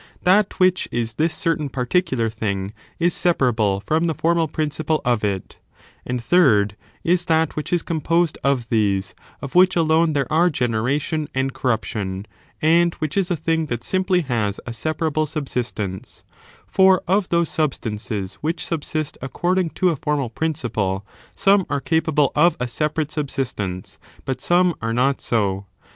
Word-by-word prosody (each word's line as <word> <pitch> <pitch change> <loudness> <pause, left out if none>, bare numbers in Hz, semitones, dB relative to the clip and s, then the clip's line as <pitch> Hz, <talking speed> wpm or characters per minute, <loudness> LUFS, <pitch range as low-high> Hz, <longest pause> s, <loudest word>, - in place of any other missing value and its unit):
That 195 +3 +3
which 185 0 +3
is 115 -1 -2
this 160 +7 0
certain 155 -3 -1
particular; 130 -1 0
thing 100 -3 -3 0.3
ii^ 170 +1 +3
separable 120 - +1
from 155 - 0
the 160 - -1
formal 165 +2 +1
principle 155 +1 -1
of 120 -3 +1
it, 100 -3 -3 0.5
and 125 0 -1
third 115 - +3 0.3
is 175 +1 +2
that 160 -1 +1
which 150 - -4
is 175 -2 +1
composed 165 0 0
of 130 -4 +1
these, 100 -4 +1 0.3
of 140 - -6
which 185 +1 +5
alone 160 -1 +3
there 140 -2 +1
are 170 +3 +4
generation 135 +4 -1
and 135 0 0
corruption, 100 -5 -2 0.4
and 170 +2 +4
which 155 -2 -4
is 195 -2 +1
a 175 - +1
thing 160 0 0
that 120 -3 -4
simply 185 -1 +1
has 115 - -1
a 120 - -5
separable 155 +5 -1
subsistence; 120 - -4 0.4
for 190 -1 +4
of 190 +1 +2
those 170 -1 +2
substances 105 -9 -3
which 165 +3 -2
subsist 155 -2 -3
according 175 +6 0
to 180 +3 +1
a 165 - 0
formal 140 -4 -1
principle 115 -11 -2 0.3
some 195 0 +4
are 140 - 0
capable 150 -1 +1
of 170 +4 +4
a 125 - -3
jBeparate 150 +4 -2
subsistence, 120 - -4 0.3
but 130 -1 -3
some 175 0 +3
are 115 0 -1
not 130 +3 +1
so. 100 -4 -1
150 Hz, 155 wpm, -22 LUFS, 115-165 Hz, 0.5 s, which